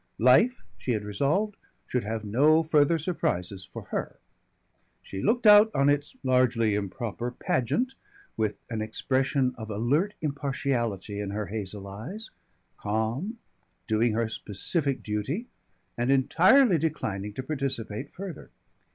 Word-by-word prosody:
Life 135 - +4 0.2
she 125 - -1
had 105 -2 -2
resolved 145 - 0 0.3
should 125 - -1
have 110 +1 -4
no 150 +10 +4
further 155 0 +3
surprises 95 - -2
for - - -9
her. - - -3 0.9
She 95 - -6
looked 240 - +1
out 210 +1 +9
on 140 +1 +4
its 145 0 0
(largely 125 -4 +3
improper) 110 +4 -3
pageant 130 - -1 0.4
with 110 -2 -1
an 110 -1 -2
expression 130 +4 0
of 110 -1 -7
alert 140 - 0
impartiality 130 - -2
in 100 -1 -3
her 105 +1 -3
hazel 100 0 -3
eyes, 140 - -7 0.5
calm, 110 - -2 0.5
doing 110 +1 +2
her 115 +1 +1
specific 130 - -1
duty, 115 - -2 0.5
and 120 +1 -1
entirely 180 - +5
declining 105 -10 -2
to 130 - -5
participate 135 -4 -3
further. 190 -2 -8
125 Hz, 125 wpm, -27 LUFS, 105-155 Hz, 0.9 s, out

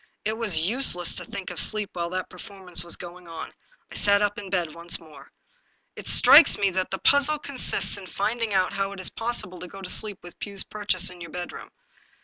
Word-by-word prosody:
It 215 +1 0
was 220 -7 +2
useless 195 -7 +1
to 180 - -4
think 195 +2 -7
of - - -6
sleep 215 -2 -1
while 170 -1 -3
that 185 +1 -3
performance 185 -2 0
was 170 - 0
going 175 0 -11
on. 165 -1 -8 0.4
I - - -10
sat 200 0 +3
up 205 0 -1
in 200 -2 -9
bed 175 -5 -2
once 170 +1 -3
more. 155 -2 -16 0.3
" - - -43
It - - -7
strikes 320 - +8
me 200 -1 +1
that 185 0 -2
the 190 - -3
puzzle 285 - +3
consists 280 -7 +1
in 190 -2 -10
finding 225 +3 -2
out 190 -1 +1
how 195 0 -2
it 195 - -10
is 185 - 0
possible 225 -6 -3
to 180 - -8
go 195 - -11
to 190 -2 -6
sleep 210 -3 -1
with 175 - -11
Pugh's 200 -2 0
purchase 190 -3 0
in 180 -1 -14
your 170 - -8
bedroom. 175 +2 -7
190 Hz, 220 wpm, -25 LUFS, 180-210 Hz, 0.4 s, strikes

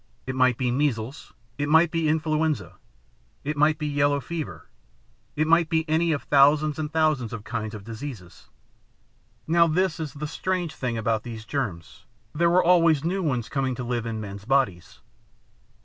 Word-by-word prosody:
It 130 - -3
might 130 -2 +3
be 125 -2 0
measles, 130 -1 -2 0.3
it 145 0 -1
might 160 +2 +5
be 165 -2 0
influenza, 155 - -1 0.7
it 150 +2 -2
might 150 +1 +3
be 150 - -4
yellow 145 -1 +1
fever; 160 +2 -6 0.7
it 155 - +1
might 165 0 +3
be 160 0 0
any 160 +2 +2
of 145 - -1
thousands 145 +2 +4
and 150 -1 -3
thousands 155 -8 +1
of 110 -3 -6
kinds 110 -1 -4
of 105 - -9
diseases. 115 -4 -9 1.0
"Now 170 +1 +4
this 175 +2 0
is 155 -4 -4
the 150 +1 -4
strange 175 +1 -2
thing 120 -3 -3
about 110 -1 0
these 110 -2 -8
germs. 110 - -5 0.3
There 170 +3 +2
were 180 +2 +4
always 165 -4 +4
new 185 +4 -1
ones 125 -9 -1
coming 135 -2 -1
to 125 - -5
live 120 -1 -2
in 110 -1 -3
men's 100 -1 -8
bodies. 125 -10 0
145 Hz, 170 wpm, -25 LUFS, 120-160 Hz, 1.0 s, might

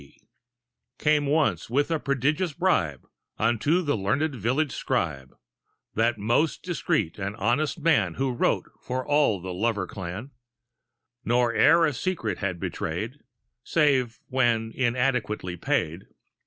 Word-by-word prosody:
C, 70 - -19 0.8
Came 150 -1 +2
once 140 - +1
with 145 +6 +1
a 160 - +1
prodigious 145 +6 0
bribe 100 - 0 0.3
Unto 120 +11 +2
the 145 -3 +1
learned 115 +10 0
village 130 +6 0
scribe, 75 - -2 0.6
That 115 +2 +1
most 120 +9 +1
discreet 160 - -1
and 100 +1 -3
honest 120 - 0
man 135 - +2
Who 135 -1 -1
wrote 120 - +1 0.2
for 130 0 -3
all 145 -9 +3
the 90 +1 -6
lover 105 +1 0
clan, 95 +8 -7 0.9
Nor 120 0 +2
e'er 165 +9 +5
a 150 - 0
secret 115 - -2
had 95 -3 -2
betrayed - - -4 0.4
Save 135 -7 +2
when 120 -3 +1
inadequately 120 -7 0
paid. 85 +1 -1
120 Hz, 130 wpm, -26 LUFS, 100-145 Hz, 0.9 s, e'er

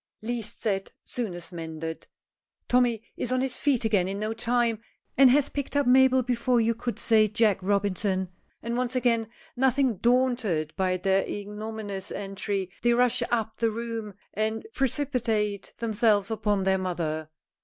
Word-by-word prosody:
Least 230 -2 -4
said, 195 -4 -1
soonest 180 -8 -5
mended! 160 -1 -6 0.6
Tommy 245 -3 +2
is 250 - -2
on 255 0 +2
his 265 -1 -1
feet 270 -6 +1
again 200 -5 +2
in 195 +1 -3
no 215 +2 -2
time, 235 -1 0 0.3
and 270 -1 +7
has 280 +2 +4
picked 280 0 -4
up 285 -1 +3
Mabel 260 +1 +5
before 245 0 +1
you 230 0 +2
could 235 +1 -4
say 220 -2 +4
Jack 215 -2 +2
Robinson, 195 -1 0 0.3
and 235 +1 -2
once 250 +1 -1
again, 235 -3 +2 0.3
nothing 260 -2 +2
daunted 235 -10 +1
by 185 -1 +1
their 190 +1 +2
ignominious 205 -1 -5
entry, 195 -1 -3
they 240 0 +3
rush 245 0 +3
up 225 -2 -1
the 230 - +2
room 225 -2 -5 0.2
and 220 +1 -2
precipitate 235 -7 0
themselves 215 -2 +2
upon 210 -3 0
their 190 0 +2
mother. 160 -4 -3
220 Hz, 150 wpm, -27 LUFS, 195-245 Hz, 0.6 s, and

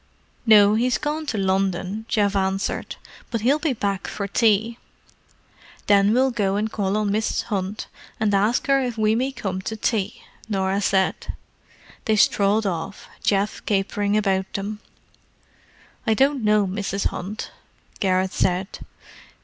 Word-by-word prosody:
"No—he's 215 +3 +5
gone 300 +1 -3
to 225 - -2
London," 195 +2 -1
Geoff 205 -2 +1
answered. 190 0 -1 0.3
"But 230 -3 -2
he'll 270 +7 +3
be 305 -3 0
back 200 -4 -2
for 200 -1 -4
tea." 220 +2 +2 1.1
"Then 200 0 +4
we'll 260 +3 +3
go 200 -5 0
and 215 +2 -1
call 200 -1 -1
on 210 -2 0
Mrs. 215 +2 0
Hunt 200 -1 -3 0.3
and 215 -2 +1
ask 210 +5 +2
her 275 -1 +3
if 245 -3 -3
we 215 0 +2
may 255 +4 0
come 195 -7 -4
to 220 +3 -5
tea," 215 -2 -1 0.3
Norah 195 -1 0
said. 190 -1 0 0.7
They 220 - +2
strolled 205 +1 +3
off, 190 +2 -4
Geoff 200 +1 0
capering 205 +1 +1
about 195 -2 0
them. 205 +2 -4 1.3
"I 220 - +3
don't 270 0 +2
know 210 -1 +3
Mrs. 195 +1 -2
Hunt," 200 +4 -6 0.5
Garrett 185 -1 +1
said. 185 +2 -1
205 Hz, 140 wpm, -23 LUFS, 195-220 Hz, 1.3 s, No—he's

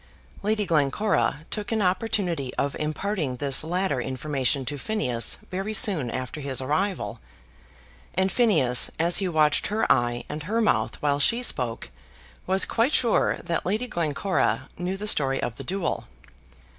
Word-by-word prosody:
Lady 210 0 0
Glencora 155 +1 +1
took 210 0 -3
an 225 - +1
opportunity 180 - 0
of 140 0 -1
imparting 155 -2 -2
this 140 +2 +2
latter 170 -5 -1
information 135 +1 -1
to 145 +2 -4
Phineas 125 - 0
very 195 +4 -2
soon 165 - +2
after 130 +4 -5
his 135 -2 -3
arrival; 160 +8 -1 1.0
and 190 +1 +2
Phineas, 155 - +4
as 170 +2 +2
he 195 - 0
watched 155 -3 +2
her 215 +2 0
eye 120 -1 +1
and 155 - -5
her 210 +9 -1
mouth 110 - +1
while 145 -1 +2
she 235 +11 +3
spoke, 125 - -1 0.6
was 190 +1 +4
quite 240 +6 +1
sure 235 -3 +2
that 170 - -2
Lady 215 +7 -1
Glencora 175 - -1
knew 180 +2 -3
the 210 - -5
story 135 -9 +3
of 115 - -3
the 135 - -6
duel. 190 +6 -2
165 Hz, 150 wpm, -25 LUFS, 135-200 Hz, 1.0 s, Phineas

